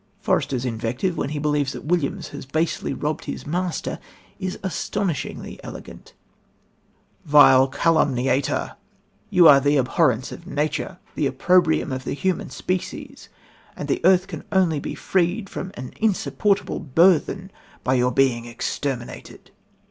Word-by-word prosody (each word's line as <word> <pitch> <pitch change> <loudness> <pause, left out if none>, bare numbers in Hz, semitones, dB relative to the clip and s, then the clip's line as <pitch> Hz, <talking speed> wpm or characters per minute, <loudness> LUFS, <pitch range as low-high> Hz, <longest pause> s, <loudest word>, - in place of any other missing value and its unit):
Forester's 130 -2 0
invective, 125 +9 -2
when 140 - -2
he 150 - -4
believes 145 -2 0
that - - -8
Williams 160 -3 -1
has - - -9
basely 155 +3 -1
robbed 150 +1 -3
his - - -6
master 175 +3 -2 0.4
is 185 -1 -3
astonishingly 190 -3 -3
elegant: - - -10 1.1
"Vile 135 -3 +7
calumniator! 135 -3 +1 0.5
You 175 -2 +6
are 140 -2 +9
the 145 +2 +2
abhorrence 125 -1 +1
of 170 - -10
nature, 155 +1 -2 0.2
the 145 - 0
opprobrium 160 +2 +2
of 130 0 -4
the - - -3
human 180 +2 -1
species 185 +7 -5 0.5
and - - -6
the - - 0
earth 185 +1 +5
can - - -8
only 180 -6 +2
be - - -5
freed 190 +3 0
from 190 - -5
an 125 +1 -8
insupportable 205 -1 0
burthen 170 +5 +2 0.3
by 130 - +1
your 125 -1 +2
being 125 -2 +2
exterminated." 120 +1 -5
150 Hz, 135 wpm, -23 LUFS, 130-180 Hz, 1.1 s, are